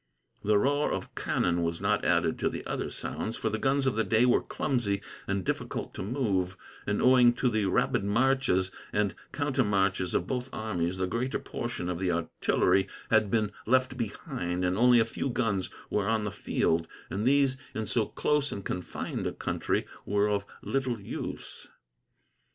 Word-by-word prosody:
The 105 0 +4
roar 145 +7 +2
of - - -4
cannon 85 0 0
was 85 0 -1
not - - +1
added - - +2
to - - +1
the - - -6
other - - -2
sounds, 110 - -4
for 110 - -1
the 110 - -1
guns 135 +2 +2
of 130 - +1
the 110 - +2
day 110 +4 +3
were 125 - +4
clumsy 120 -8 -1 0.3
and 100 -2 -1
difficult - - -3
to - - -6
move; 95 -5 -1 0.3
and, 105 0 0
owing 125 -1 +7
to 125 +1 +1
the 110 -3 +1
rapid 95 - +2
marches 115 -3 +2 0.2
and 105 -2 +1 0.2
countermarches 100 -10 +1
of 85 - +1
both 125 +4 -3
armies, 95 -5 -2
the 95 - 0
greater 120 +8 -1
portion 120 -7 -4
of 90 -1 -2
the 95 -1 +1
artillery 90 +3 +2 0.2
had 110 -2 +4
been 105 -1 +1 0.2
left 130 +2 +3
behind, 90 -6 -3
and 90 +1 +1
only 120 +2 +6
a 110 - +4
few 115 +4 -3
guns 105 -6 0 0.2
were 100 -2 +1
on 110 -1 +1
the 105 - -2
field, 80 -4 0 0.2
and 105 +4 -1
these, 135 -1 +4 0.2
in 110 - -2
so 105 +2 0
close 150 -1 0
and 100 - -6
confined 90 - -3
a - - -1
country, - - -1 0.2
were 105 0 +2
of 100 -1 0 0.2
little 130 -4 -1
use. 100 - -6
105 Hz, 175 wpm, -29 LUFS, 95-125 Hz, 0.3 s, owing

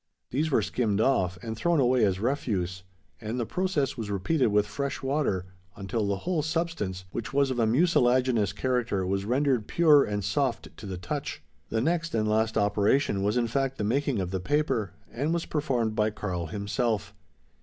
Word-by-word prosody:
These 150 +5 0
were 115 -7 +2
skimmed 105 -2 0
off, 90 -8 +2
and 110 -1 -4
thrown 170 +7 +1
away 125 -2 +3
as 95 -2 0
refuse; 100 -7 -1 0.4
and 110 +3 -3
the 120 - 0
process 180 - -1
was 110 -3 -4
repeated 115 - +1
with 105 -1 +3
fresh 140 +7 -4
water 135 -10 0 0.3
until 105 +2 -2
the 100 -1 0
whole 175 -3 +1
substance, 160 - -2
which 115 +2 -5
was 140 -1 +2
of 125 - -2
a 115 - +3
mucilaginous 125 - +3
character, 115 -4 -1
was 95 +1 -1
rendered 125 -1 +1
pure, 155 -4 +5
and 105 -1 -2
soft 130 +5 -1
to 105 - -8
the 95 -2 -4
touch. 90 0 -5 0.3
The 110 - 0
next 165 +2 0
and 110 -1 +1
last 110 +1 +1
operation 105 +2 +2
was 105 +4 +1
in 120 - +2
fact 135 +3 -1
the - - -2
making 130 +2 0
of 90 -1 -2
the 95 - -1
paper; 130 - 0 0.2
and 150 +7 -1
was 170 - -2
performed 125 -7 -1
by 105 0 +2
Karl 95 -5 -4
himself. 105 +2 -2
115 Hz, 185 wpm, -27 LUFS, 100-140 Hz, 0.4 s, pure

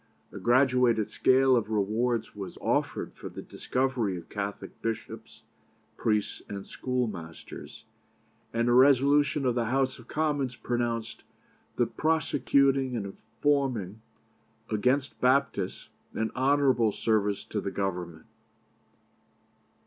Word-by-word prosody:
A - - -8
graduated 125 -3 +3
scale 130 0 +4
of 115 -3 0
rewards 110 +3 0
was 100 -2 -7
offered - - -1
for - - -8
the - - -8
discovery 125 -7 -1
of 85 - -11
Catholic 100 -1 -5
bishops, 115 -1 -5 0.5
priests, 105 -2 0
and 100 -1 -6
schoolmasters; 110 -11 -5 0.7
and 115 +1 0
a 120 - +4
resolution 140 +2 +4
of 125 - +3
the 120 -1 0
House 130 +2 0
of 120 - -14
Commons 145 -5 -1
pronounced 120 -2 -3 0.5
'the - - +2
prosecuting 140 -4 +2
and 105 -4 -2
informing 110 -1 -1 0.7
against 125 +6 0
Papists' 130 -7 +1 0.3
'an 110 0 -1
honourable 130 -4 +3
service 105 -2 0
to 105 - -3
the 100 - -3
Government.' 90 -5 -4
120 Hz, 110 wpm, -28 LUFS, 105-135 Hz, 0.7 s, scale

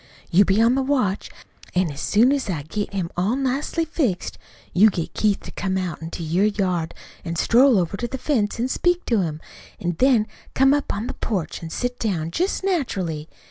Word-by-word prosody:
You 195 +4 +6
be 195 +3 +2
on 230 +2 +5
the 270 - +1
watch, 255 -8 0 0.5
an' 180 -3 +2
as 140 - -7
soon 230 +6 +4
as 280 -6 -1
I 160 -6 -2
get 205 +7 -4
him 185 -4 -3
all 195 +7 +1
nicely 275 +5 -1
fixed, 265 - -2 0.3
you 210 +4 +6
get 170 -5 -4
Keith 210 -2 +1
to - - -9
come 190 -1 -2
out 180 -4 -3
into 165 +1 -6
your 170 +5 +2
yard 185 -6 -1 0.3
an' 170 -1 -4
stroll 245 +7 +5
over 180 +1 0
to 240 - -2
the 265 - -5
fence 230 -7 0
an' 245 - +1
speak 355 +6 +1
to 225 -5 +2
him, 155 -3 -3 0.4
an' 175 -2 -2
then 255 -5 +4 0.3
come 270 +1 +5
up 290 -1 0
on 205 - -3
to - - -4
the - - -3
porch 195 -8 -3
an' 165 - -6
sit 245 +8 -3
down, 170 -7 -1
just 370 - -1
naturally. 190 - -1
205 Hz, 210 wpm, -23 LUFS, 175-260 Hz, 0.5 s, You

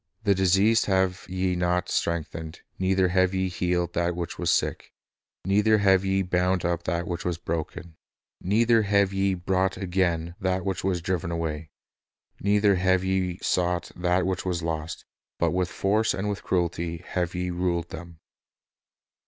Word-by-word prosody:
The 100 -2 +4
diseased 95 +4 +3
have 95 -1 +1
ye 95 0 0
not 90 +1 0
strengthened, 80 -1 -3 0.2
neither 95 0 +2
have 95 +1 +2
ye 95 0 0
healed 90 -1 -1
that 85 0 0
which 85 -1 -5
was - - 0
sick, - - 0 0.5
neither 105 +3 +4
have 95 -2 +4
ye 95 0 +1
bound 90 0 +1
up 85 -1 -1
that 85 +1 -1
which 85 -1 -3
was 90 -2 -2
broken, 85 0 -5 0.4
neither 115 +4 +3
have 100 -1 +2
ye 95 0 +1
brought 95 +1 0
again 90 -3 -1
that 95 -1 0
which 95 -2 -2
was 90 -3 -1
driven 90 -1 -1
away, 80 -2 -3 0.7
neither 100 -1 +3
have 95 0 +2
ye 95 -2 0
• - - -19
sought 90 -1 0
that 90 +1 +1
which 95 0 -1
was 90 -3 -2
lost; 80 -1 -4 0.3
but - - +1
with 90 -1 0
force 105 +5 +1
and 100 +2 -3
with 100 - -3
cruelty 85 -1 -2
have 90 -1 -2
ye 90 0 -2
ruled 85 -1 -1
them."" 85 +1 -9
90 Hz, 160 wpm, -26 LUFS, 85-95 Hz, 0.7 s, The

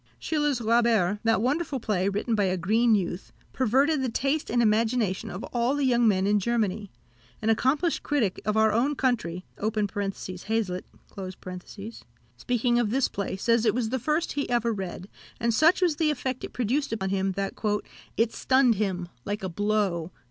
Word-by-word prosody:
Schiller's 295 -4 0
Räuber, 225 -4 +2
that 225 -1 +2
wonderful 285 +1 0
play, 200 -4 0
written 205 +4 -1
by 205 -2 +2
a 185 0 0
green 220 +6 +3
youth, 180 -2 -3 0.2
perverted 270 +4 +2
the 260 - 0
taste 275 +6 -1
and 240 - +1
imagination 220 -3 +1
of 185 - -6
all 240 +3 +1
the 290 -1 0
young 240 -2 +3
men 190 -3 +2
in 205 +1 +3
Germany. 210 -2 -1 0.5
An 220 +1 +1
accomplished 280 +9 +1
critic 245 -11 0
of 210 +1 0
our 220 0 +4
own 260 +7 +1
country 215 -10 -1
(Hazlitt), 205 -1 -2 1.5
speaking 240 - +1
of 235 -3 +1
this 260 +4 +2
play, 200 -1 -3
says 230 +3 +2
it 215 -2 +2
was 240 -3 0
the 260 +2 -1
first 305 +7 0
he 285 0 -2
ever 235 -1 +1
read, 190 -2 -6 0.3
and 235 -1 +1
such 320 +9 +4
was 330 -5 +2
the 315 -2 +2
effect 260 -3 -2
it - - -5
produced 255 +5 -1
on 190 0 -2
him, 195 0 0
that 195 0 -3 0.6
"it 230 0 +2
stunned 260 -2 +3
him, 180 -4 -1 0.2
like 205 +4 -4
a 190 - -2
blow." 195 -3 0
225 Hz, 170 wpm, -26 LUFS, 200-255 Hz, 1.5 s, our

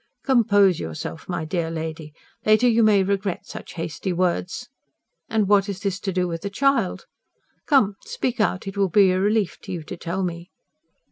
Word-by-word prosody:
"Compose 205 - +4
yourself, 160 +1 -6
my 170 -3 -2
dear 165 0 -2
lady. 160 -1 -5 0.3
Later 215 +3 +4
you 230 -1 +4
may 210 -3 +5
regret 195 -1 -2
such - - -9
hasty 165 +2 -3
words. 180 +6 -1 0.6
And 220 -3 +1
what 200 0 +4
has 200 -2 -4
this 195 -3 -2
to 195 - -3
do 180 0 0
with 165 -1 -4
the 200 - -3
child? 275 +7 +1 0.6
Come, 215 -9 +4
speak 455 - -3
out. 185 -3 +1
It 195 0 -6
will 200 -1 +1
be 195 +1 +5
a 185 - +1
relief 205 -1 +1
to - - -8
you 170 -3 -4
to 185 - -7
tell 180 +3 -3
me." 170 0 -4
195 Hz, 185 wpm, -23 LUFS, 175-210 Hz, 0.6 s, may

